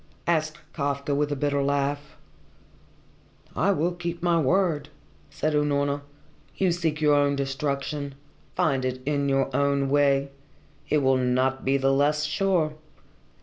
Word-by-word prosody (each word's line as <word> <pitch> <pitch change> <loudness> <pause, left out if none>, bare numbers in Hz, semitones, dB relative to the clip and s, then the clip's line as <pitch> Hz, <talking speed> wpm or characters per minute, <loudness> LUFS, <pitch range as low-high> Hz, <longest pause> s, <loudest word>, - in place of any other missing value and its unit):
asked 155 -2 0 0.2
Kafka 140 -1 -2
with 145 +1 0
a - - 0
bitter 145 0 0
laugh. 140 +1 -1 1.4
"I 200 - +2
will 175 -2 +1
keep 170 -1 -5
my 170 -1 +3
word," 155 -1 +1 0.4
said 155 0 -2
Unorna. 145 -1 +1 0.6
"You 190 -2 +2
seek 165 -3 -1
your 150 -1 +4
own 145 0 +3
destruction. 140 +1 -3 0.4
Find 135 -4 +1
it 130 0 -3
in 140 -1 0
your 135 -1 0
own 140 -1 +1
way. 140 -1 +3 0.6
It 150 -2 +2
will 130 0 +4
not 130 +1 +1
be 135 +1 +2
the 135 0 +2
less 150 +2 +2
sure. 160 0 +1
145 Hz, 140 wpm, -25 LUFS, 140-155 Hz, 1.4 s, your